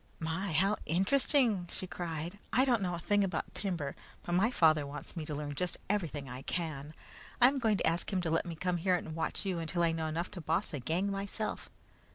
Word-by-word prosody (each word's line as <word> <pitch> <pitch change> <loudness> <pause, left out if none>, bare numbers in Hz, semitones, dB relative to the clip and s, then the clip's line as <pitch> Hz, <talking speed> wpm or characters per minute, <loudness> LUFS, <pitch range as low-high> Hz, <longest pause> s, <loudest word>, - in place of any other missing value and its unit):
"My! 165 +4 -2
How 195 +6 +3
interesting!" 205 - +3
she - - -5
cried. 175 +1 -4
"I 260 - +5
don't 240 -5 +3
know 180 -2 0
a - - -5
thing 205 +3 +2
about 180 -4 -2
timber, 175 -8 -2 0.3
but - - -4
my 195 +6 +4
father 155 -10 +4
wants 145 +5 -7
me 160 -3 -3
to 150 - -3
learn 145 0 -3
just 175 +5 -1
everything 155 -9 -1
I 125 +1 -6
can. 155 -2 -4 0.4
I 245 - +9
am 275 0 -2
going 220 -4 +3
to - - 0
ask 165 +5 0
him 190 - +1
to 165 -2 -1
let 165 +2 +1
me 170 - -4
come 180 +2 0
here 180 +2 +2
and 160 -2 -4
watch 165 +4 -2
you 185 -3 0
until 165 +1 -1
I 165 - +4
know 160 -1 -1
enough 165 +3 -2
to 175 - -7
boss 165 +6 0
a 145 - -2
gang 170 +10 0
myself. 200 +2 -3
175 Hz, 225 wpm, -32 LUFS, 160-195 Hz, 0.4 s, I